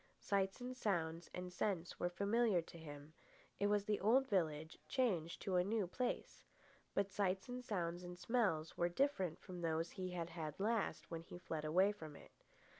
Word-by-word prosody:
Sights 195 +1 +1
and 250 +1 -4
sounds 170 -7 0
and 180 0 -5
scents 180 -2 -1
were 175 - +1
familiar 205 +2 +3
to 170 0 -7
him. 145 -1 -9 0.5
It 205 - +3
was 205 -1 +3
the 210 -1 +1
old 255 +6 +5
village 160 - 0
changed 190 - +1
to 185 -2 +2
a 180 - +5
new 210 +1 +1
place. 245 +8 -2 0.5
But 200 0 +2
sights 190 0 +1
and 250 0 -4
sounds 175 -6 -1
and 175 0 -7
smells 185 -8 +1
were 175 - +2
different 190 - +1
from 180 -3 -7
those 165 0 0
he 185 -1 -3
had 170 -2 -3 0.3
last 220 +2 +1
had - - -24
when 165 -1 -3
he 170 - -9
fled 160 -3 -3
away 185 +6 +5
from 160 -8 -8
it. - - -13
185 Hz, 185 wpm, -40 LUFS, 170-210 Hz, 0.5 s, old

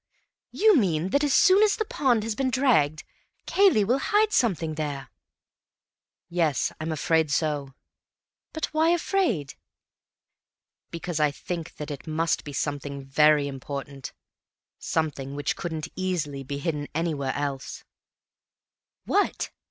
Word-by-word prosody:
You 430 -1 +4
mean 180 - +1
that 280 +8 +2
as 290 - +1
soon 375 +8 +6
as 430 -1 +4
the 435 - -2
pond 245 - +1
has 225 0 -2
been 260 +4 0
dragged, 230 - +2 0.4
Cayley 385 - +4
will 245 +7 +1
hide 420 +8 +2
something 170 - +1
there?" 145 -3 -4 1.2
"Yes, 165 -5 0
I'm 160 +1 -2
afraid 160 0 +1
so." 145 -3 -1 0.8
"But 315 - -2
why 315 +1 +3
afraid?" 340 - 0 1.4
"Because 170 -1 -4
I 150 -1 +4
think 165 +3 -6
that 150 0 -6
it 145 +3 -8
must 160 +1 0
be 145 - -7
something 140 0 -3
very 150 +1 +4
important, 140 0 -6 0.7
something 140 -4 -2
which 145 0 -1
couldn't 160 -2 -4
easily 170 -7 -2
be 140 +1 -5
hidden 150 -1 -3
anywhere 155 -5 -1
else." 140 -2 -4 1.2
"What?" - - 0
160 Hz, 130 wpm, -26 LUFS, 145-225 Hz, 1.4 s, soon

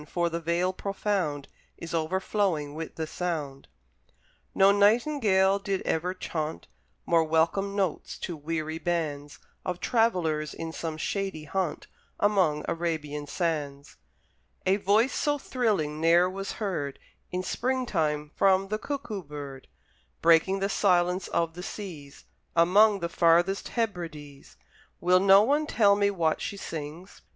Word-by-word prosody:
for 170 -1 0
the 170 - -2
Vale 170 +3 0
profound 190 -7 -2 0.3
Is 170 0 -8
overflowing 165 -2 0
with 160 +1 -6
the 160 - -3
sound. 155 -5 -4 0.9
No 195 +1 +6
Nightingale 205 -2 +3
did 195 -1 -2
ever 180 +3 -1
chaunt 160 -3 -4 0.4
More 165 -1 +3
welcome 165 +5 +1
notes 190 -5 -2
to 175 - -5
weary 160 +1 -4
bands 150 -5 -3 0.3
Of 180 -1 -3
travellers 175 -10 +1
in 165 0 -5
some 160 -2 -4
shady 195 -1 -3
haunt, 170 +1 -2 0.3
Among 185 -8 +2
Arabian 150 -3 -3
sands: 145 -4 -3 0.7
A 190 +1 +3
voice 210 +6 +2
so 290 -1 0
thrilling 205 - -1
ne'er 170 +2 +5
was 195 +1 -5
heard 170 -10 -3 0.3
In 180 +1 -2
spring 255 +6 -1
time 150 -7 -1
from 195 0 +3
the 215 +1 -2
Cuckoo 255 -8 -4
bird, 145 -4 -9 0.5
Breaking 170 +4 +4
the 195 - +2
silence 180 -2 +2
of 165 -1 -1
the 175 - -8
seas 170 -8 -8 0.3
Among 200 +4 +5
the 170 - -2
farthest 175 +3 +3
Hebrides. 165 - -5 0.4
Will 180 +1 +4
no 195 +1 +7
one 295 +6 +1
tell 205 -6 +4
me 200 0 +2
what 165 -5 0
she 200 - -4
sings? 160 +2 -7
175 Hz, 135 wpm, -27 LUFS, 155-200 Hz, 0.9 s, no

